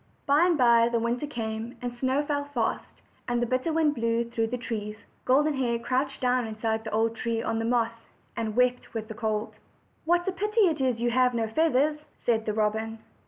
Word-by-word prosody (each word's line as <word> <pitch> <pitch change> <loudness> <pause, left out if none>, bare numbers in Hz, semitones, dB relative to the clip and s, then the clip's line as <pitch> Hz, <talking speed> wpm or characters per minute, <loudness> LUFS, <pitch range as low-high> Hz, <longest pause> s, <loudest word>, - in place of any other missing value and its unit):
By 295 +5 +4
and 345 -3 +2
by 235 -2 +5
the 235 - +1
winter 235 +5 -1
came; 230 -2 -5
the 245 -1 -3
snow 260 +4 0
fell 285 -1 -1
fast 260 -6 -3 0.2
and 240 -1 0
the 240 - +1
bitter 255 +6 0
wind 315 -2 +2
blew 230 -2 0
through 230 -1 -1
the 250 +2 -3
trees. 210 -3 -4 0.3
Golden 295 +4 +3
Hair 245 -4 0
crouched 255 +4 -1
down 250 -2 +1
inside 220 0 -2
the 220 - -6
old 225 +1 +1
tree 230 0 -2
on 225 - -1
the 225 - -1
moss, 230 -1 -1 0.3
and 220 -2 -3
wept 250 -1 +1
with 220 0 -4
the - - -5
cold. 220 -1 -2 0.5
"What 350 +2 +2
a - - +2
pity 425 +5 0
it 325 -8 +3
is 250 -3 0
you 240 - +2
have 250 0 +3
no 225 -1 0
feathers!" 300 +3 +2 0.2
said 225 -2 0
the 215 - 0
robin. 220 +1 -1
240 Hz, 210 wpm, -27 LUFS, 225-270 Hz, 0.5 s, by